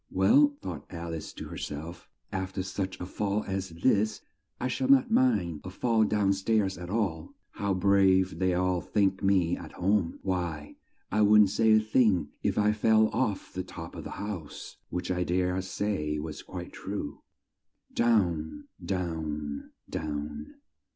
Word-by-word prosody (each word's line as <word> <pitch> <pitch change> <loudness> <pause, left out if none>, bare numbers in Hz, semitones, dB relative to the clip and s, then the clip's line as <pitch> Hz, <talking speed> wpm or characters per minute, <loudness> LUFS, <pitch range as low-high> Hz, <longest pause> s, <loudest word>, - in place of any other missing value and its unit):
"Well," 140 +10 +4
thought 85 -6 -6
Al 85 -1 -5
ice 80 - -5
to - - -7
her - - -7
self, 80 +4 -7 0.2
"af 95 0 -3
ter 95 - -2
such 95 0 -4
a 90 - -4
fall 100 +2 -1
as 95 -1 -3
this, 105 +5 +1 0.4
I - - -1
shall 130 +1 -1
not 135 -1 +5
mind 95 - +2
a 90 - -6
fall 110 +3 +2
down 105 -2 +2
stairs 100 0 +1
at 90 0 -7
all. 95 -7 -2 0.2
How 100 -2 -1
brave 95 -2 +3
they'll 90 -1 +2
all 90 -1 +1
think 95 +4 +1
me 95 -4 +3
at - - -10
home! 95 -1 +1
Why, 85 -6 -3 0.3
I 105 - +2
wouldn't 105 -1 +6
say 110 +1 +4
a 110 - +7
thing 110 - +2
if - - 0
I 105 0 +4
fell 110 0 +4
off 105 -7 -2
the 90 - -2
top 85 -2 -8
of - - -7
the - - -7
house." 95 -7 -6
(Which 90 +1 -3
I 90 0 0
dare 90 +1 0
say 95 -5 -2
was 75 0 -5
quite 90 -1 -8
true.) 95 -7 -5 0.7
Down, 90 -10 +1
down, 80 -6 -3 0.2
down. 75 -1 -5
95 Hz, 165 wpm, -29 LUFS, 85-105 Hz, 0.7 s, a